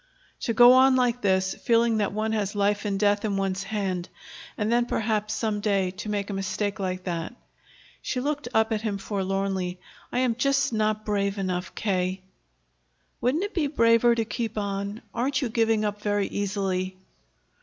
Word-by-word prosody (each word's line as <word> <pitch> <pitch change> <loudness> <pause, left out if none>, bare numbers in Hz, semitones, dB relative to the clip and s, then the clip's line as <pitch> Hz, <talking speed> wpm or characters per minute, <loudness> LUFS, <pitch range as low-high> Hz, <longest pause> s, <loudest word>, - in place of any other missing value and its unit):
"To 230 - -1
go 245 +1 +9
on 260 0 +6
like 245 -1 +1
this, 190 -1 +2
feeling 230 -1 +2
that 205 -2 0
one 215 +1 -1
has 210 -2 -1
life 205 +1 +1
and 200 -1 -1
death 205 0 +2
in 205 -2 -1
one's 195 0 -1
hand, 190 -4 -3 0.5
and 210 +1 0
then 240 0 +2
perhaps 215 -2 -1
some 215 -2 -1
day 195 -3 +1
to 215 - -6
make 205 -1 -2
a - - -3
mistake 200 +1 -2
like 185 -1 -3
that!" 170 +4 -4 0.7
She 255 - -2
looked 290 +1 -2
up 220 -1 +2
at 215 -1 0
him 215 -3 -2
forlornly. 195 -2 -2 0.3
"I - - -2
am 250 -2 +2
just 275 +2 +1
not 215 0 0
brave 200 -1 0
enough, 185 -2 -3
K." 185 -2 -1 1.0
"Wouldn't 275 +9 +1
it 410 - -4
be 315 -5 +1
braver 230 -3 +4
to 225 -1 0
keep 225 0 -4
on? 200 +1 -3
Aren't 255 +3 0
you 250 - -1
giving 225 -1 +2
up 205 0 -3
very 205 -1 +1
easily?" 190 -2 -2
210 Hz, 175 wpm, -26 LUFS, 195-230 Hz, 1.0 s, go